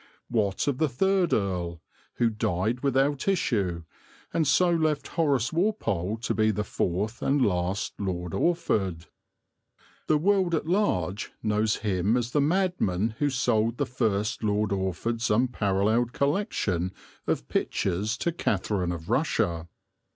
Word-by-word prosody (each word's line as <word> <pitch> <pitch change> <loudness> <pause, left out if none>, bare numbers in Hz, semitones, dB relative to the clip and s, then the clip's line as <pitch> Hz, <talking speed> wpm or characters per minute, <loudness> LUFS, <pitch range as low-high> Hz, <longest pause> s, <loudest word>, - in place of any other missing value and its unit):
What 105 -1 0
of 140 -3 0
the 155 -2 +2
third 190 +7 +2
earl, 90 -4 -1 0.4
who 115 -1 +2
died 105 +3 -1
without 135 +2 +1
issue, 100 - 0 0.5
and 160 -3 +1
so 175 +5 +4
left 155 -3 0
Horace 140 -6 +1
Walpole 115 - 0
to - - 0
be 110 0 +2
the 105 0 0
fourth 105 +4 -2
and 140 +1 +2
last 90 0 -1
Lord 90 -4 -3
Orford? 100 - 0 1.0
The 155 - +4
world 185 +1 +2
at 155 - -2
large 110 - 0
knows 105 0 +1
him 100 +3 +2
as 120 -1 -2
the 145 - +2
madman 145 - +1
who 145 - +2
sold 120 -3 +1
the - - 0
first 110 -3 -1
Lord 105 -1 +1
Orford's 100 +4 -1
unparalleled 110 0 +1
collection 110 - 0 0.3
of - - -1
pictures 100 +5 -1
to 170 - 0
Catherine 100 - -1
of 85 -2 -6
Russia. 85 -1 0
110 Hz, 135 wpm, -27 LUFS, 95-145 Hz, 1.0 s, so